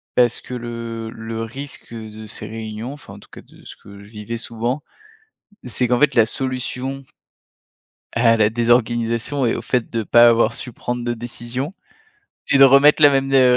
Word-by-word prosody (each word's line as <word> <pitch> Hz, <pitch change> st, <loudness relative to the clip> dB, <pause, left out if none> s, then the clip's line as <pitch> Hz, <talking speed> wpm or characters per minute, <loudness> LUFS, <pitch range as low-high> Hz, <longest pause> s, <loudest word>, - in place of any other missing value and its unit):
Parce 120 Hz, -2 st, +3 dB
que -, -, -10 dB
le 115 Hz, -2 st, -6 dB
le 110 Hz, 0 st, -6 dB
risque 130 Hz, +2 st, -8 dB
de 110 Hz, -1 st, -9 dB
ces 105 Hz, -, -6 dB
réunions 110 Hz, +3 st, -6 dB
enfin, 145 Hz, -9 st, -12 dB
en -, -, -12 dB
tout -, -, -18 dB
cas, -, -, -12 dB
de -, -, -20 dB
ce -, -, -10 dB
que 100 Hz, 0 st, -14 dB
je 100 Hz, -, -14 dB
vivais 110 Hz, +2 st, -6 dB
souvent, 120 Hz, +4 st, -3 dB, 0.8 s
c'est 125 Hz, 0 st, 0 dB
qu'en 125 Hz, 0 st, +2 dB
fait 145 Hz, -3 st, +3 dB
la 115 Hz, -3 st, +6 dB
solution 130 Hz, +2 st, -3 dB, 1.1 s
à 115 Hz, -1 st, +3 dB
la 110 Hz, -1 st, +3 dB
désorganisation 120 Hz, +2 st, +1 dB
et 115 Hz, -, +1 dB
au -, -, -6 dB
fait 125 Hz, -3 st, -1 dB
de 115 Hz, -1 st, -2 dB
pas 120 Hz, +2 st, +6 dB
avoir 115 Hz, -1 st, +3 dB
su 125 Hz, -, -6 dB
prendre 120 Hz, +1 st, -4 dB
de 120 Hz, -, -1 dB
décision, 120 Hz, +6 st, -5 dB, 0.7 s
c'est 140 Hz, -, +2 dB
de 135 Hz, -, +9 dB
remettre 140 Hz, +3 st, +6 dB
la 145 Hz, -, +9 dB
même, 135 Hz, 0 st, 0 dB
heu, 125 Hz, -2 st, +5 dB
120 Hz, 185 wpm, -20 LUFS, 115-130 Hz, 1.1 s, de